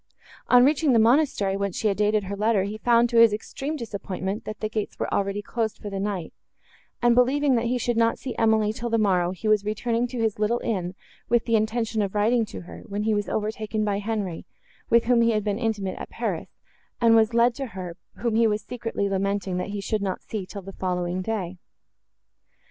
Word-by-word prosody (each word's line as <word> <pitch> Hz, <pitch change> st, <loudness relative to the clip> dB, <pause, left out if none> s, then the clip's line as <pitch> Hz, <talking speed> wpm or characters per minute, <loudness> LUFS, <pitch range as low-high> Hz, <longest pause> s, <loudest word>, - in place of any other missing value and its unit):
On 245 Hz, 0 st, +7 dB
reaching 295 Hz, -1 st, +3 dB
the -, -, +5 dB
monastery, 225 Hz, -4 st, +3 dB
whence 200 Hz, -2 st, -2 dB
she 220 Hz, -, +1 dB
had 200 Hz, -, 0 dB
dated 210 Hz, 0 st, +2 dB
her 200 Hz, +1 st, -4 dB
letter, 210 Hz, -1 st, +2 dB
he 210 Hz, +2 st, -5 dB
found, 235 Hz, +1 st, +4 dB
to 235 Hz, -, +1 dB
his 230 Hz, -1 st, +8 dB
extreme 270 Hz, +8 st, -4 dB
disappointment, 200 Hz, -4 st, -4 dB
that 215 Hz, -1 st, -6 dB
the 215 Hz, -, -1 dB
gates 215 Hz, -1 st, -4 dB
were -, -, -3 dB
already 200 Hz, +1 st, -1 dB
closed 225 Hz, 0 st, -2 dB
for 205 Hz, -, -7 dB
the 195 Hz, -, -3 dB
night; 195 Hz, -5 st, -3 dB, 0.7 s
and 240 Hz, 0 st, +5 dB
believing, 265 Hz, +3 st, +3 dB
that 235 Hz, -1 st, +1 dB
he 250 Hz, +1 st, +1 dB
should 240 Hz, -1 st, -1 dB
not 230 Hz, 0 st, +3 dB
see 260 Hz, -, -6 dB
Emily, 220 Hz, -2 st, +2 dB
till 235 Hz, +1 st, -4 dB
the 230 Hz, -, +2 dB
morrow, 185 Hz, -5 st, +2 dB
he 190 Hz, +4 st, -5 dB
was 215 Hz, -1 st, +3 dB
returning 230 Hz, +3 st, -1 dB
to 250 Hz, +1 st, -7 dB
his 220 Hz, -3 st, 0 dB
little 215 Hz, +3 st, +2 dB
inn, 185 Hz, -5 st, -2 dB, 0.3 s
with 235 Hz, 0 st, +2 dB
the 230 Hz, -, +2 dB
intention 220 Hz, 0 st, 0 dB
of 200 Hz, 0 st, -2 dB
writing 225 Hz, +3 st, +3 dB
to -, -, -8 dB
her, 175 Hz, -, -11 dB
when 205 Hz, +1 st, -3 dB
he 220 Hz, 0 st, +1 dB
was 205 Hz, -1 st, -1 dB
overtaken 215 Hz, 0 st, -2 dB
by 200 Hz, -1 st, 0 dB
Henri, 205 Hz, -5 st, -3 dB, 0.4 s
with 235 Hz, 0 st, +5 dB
whom 240 Hz, 0 st, +4 dB
he 230 Hz, 0 st, +3 dB
had 215 Hz, -1 st, 0 dB
been 205 Hz, +1 st, -1 dB
intimate 210 Hz, -5 st, -2 dB
at -, -, -7 dB
Paris, -, -, -3 dB, 0.5 s
and 230 Hz, -1 st, +5 dB
was 225 Hz, +1 st, +3 dB
led 235 Hz, +1 st, +4 dB
to 270 Hz, +2 st, -5 dB
her, 185 Hz, -5 st, -7 dB, 0.2 s
whom 235 Hz, -2 st, -1 dB
he 225 Hz, +1 st, +4 dB
was 210 Hz, 0 st, -1 dB
secretly 230 Hz, -4 st, -3 dB
lamenting 195 Hz, -1 st, -1 dB
that 180 Hz, -, -3 dB
he 205 Hz, 0 st, -4 dB
should 215 Hz, +1 st, -1 dB
not 190 Hz, -2 st, -3 dB
see, 205 Hz, -4 st, -5 dB
till 200 Hz, 0 st, -8 dB
the 195 Hz, +1 st, -9 dB
following 180 Hz, -1 st, -2 dB
day. 185 Hz, -3 st, -3 dB
215 Hz, 220 wpm, -25 LUFS, 200-230 Hz, 0.7 s, his